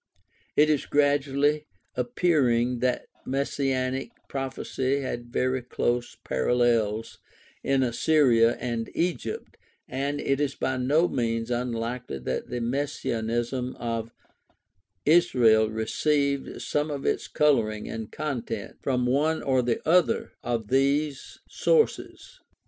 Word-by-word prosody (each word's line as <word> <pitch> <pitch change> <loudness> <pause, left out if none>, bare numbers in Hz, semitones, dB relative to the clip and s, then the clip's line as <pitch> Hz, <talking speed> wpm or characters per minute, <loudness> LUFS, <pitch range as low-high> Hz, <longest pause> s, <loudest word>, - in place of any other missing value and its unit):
It 150 - +5
is 150 - 0
gradually 145 +1 +2 0.3
appearing 125 -3 +1
that 125 0 0 0.2
messianic 135 -1 -1 0.2
prophecy 135 0 -2
had 120 -2 -5
very 130 +1 0
close 120 0 -1
parallels 115 - +1 0.4
in 135 -1 +2
Assyria 120 -2 +3
and 115 -2 -3
Egypt, 180 - -2 0.3
and 140 +2 -2
it 135 0 0
is 145 -2 0
by 130 - -1
no 145 +7 +3
means 115 -3 -1
unlikely 120 - -3
that 65 - -4
the 125 -1 -3
messianism 120 -1 -2
of 115 -1 -3 0.9
Israel 125 -10 +5
received 140 +5 0
some 150 +1 -1
of 140 -2 -4
its - - 0
coloring 115 -8 +1
and 110 -1 -6
content 120 -8 -4
from 125 -2 0
one 150 +6 +1
or 130 -2 +2
the 120 +2 -2
other 175 +2 +3
of 115 -3 -2
these 140 +2 +1
sources. - - 0
130 Hz, 110 wpm, -26 LUFS, 120-145 Hz, 0.9 s, It